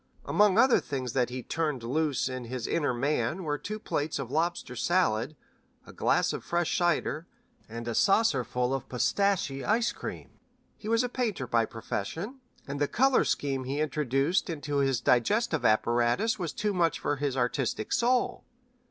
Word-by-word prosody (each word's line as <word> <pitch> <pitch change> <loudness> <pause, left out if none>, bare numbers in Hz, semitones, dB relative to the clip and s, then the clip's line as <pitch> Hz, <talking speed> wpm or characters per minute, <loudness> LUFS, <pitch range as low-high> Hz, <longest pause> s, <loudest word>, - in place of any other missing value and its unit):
Among 205 -1 +3
other 255 +2 +6
things 130 -4 -4
that 125 -2 +1
he 125 0 -5
turned 150 -6 -2
loose 145 +3 0
in 130 -2 -5
his 120 0 -4
inner 150 -5 0
man 140 +6 -1
were 150 -2 -2
two 215 +1 -5
plates 155 -7 -2
of 130 -3 -5
lobster 160 -4 -1
salad, 125 -2 +1 0.5
a - - -13
glass - - +1
of - - -5
fresh 170 -1 0
cider, 170 -2 0 0.4
and 115 +1 -6
a 120 - -1
saucerful 125 - +2
of 135 - -4
pistache 135 +3 0
ice 225 +2 +2
cream. - - -7 0.4
He 215 - -7
was 230 +2 +3
a - - 0
painter 230 - -2
by 115 -1 +2
profession, 160 - -5 0.3
and 140 +1 -5
the 145 - +3
color 265 - +3
scheme 135 -2 -1
he 135 +2 -3
thus 150 - +1
introduced 150 +4 0
into 145 -3 -3
his 135 -3 +1
digestive 155 - +2
apparatus 120 - +2
was 170 -4 -2
too 210 -1 -1
much 170 -3 +2
for 145 - -1
his 140 -2 -2
artistic 125 -3 -1
soul. 245 +1 +1
145 Hz, 170 wpm, -28 LUFS, 125-185 Hz, 0.5 s, other